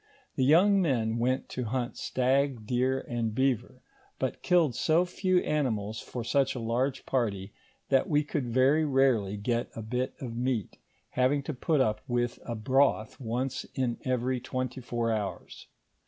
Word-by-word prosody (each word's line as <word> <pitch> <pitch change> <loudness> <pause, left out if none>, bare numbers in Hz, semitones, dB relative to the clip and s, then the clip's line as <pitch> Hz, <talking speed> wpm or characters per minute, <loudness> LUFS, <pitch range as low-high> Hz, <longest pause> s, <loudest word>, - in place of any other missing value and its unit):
The 130 - +1
young 190 +8 +5
men 115 -8 0
went 130 +2 0
to 125 - -4
hunt 125 +2 -2
stag, 130 -2 0
deer, 130 +3 +1
and 115 -2 -2
beaver, 130 -1 0 0.3
but 130 -2 -3
killed 170 -7 +3
so 160 +8 +2
few 185 +1 0
animals 110 -8 -1
for 120 - -6
such 135 +4 +1
a - - -3
large 120 +4 -1
party, 100 -6 -1 0.4
that 135 -1 +3
we 150 -1 +3
could 145 -3 -3
very 130 +6 +4
rarely 130 -8 +2
get 115 +3 -1
a 115 - -5
bit 125 +4 -2
of 120 -4 -6
meat, 120 -3 -2 0.3
having 135 +3 +1
to 155 - -4
put 140 +3 +1
up 105 -4 +1
with 120 -1 -1
a 120 - -3
broth 130 -1 +1
once 125 +2 -2
in 125 -3 -1
every 130 0 0
twenty 130 +1 -4
four 120 -1 -1
hours. 105 -3 -4
130 Hz, 160 wpm, -29 LUFS, 115-135 Hz, 0.4 s, young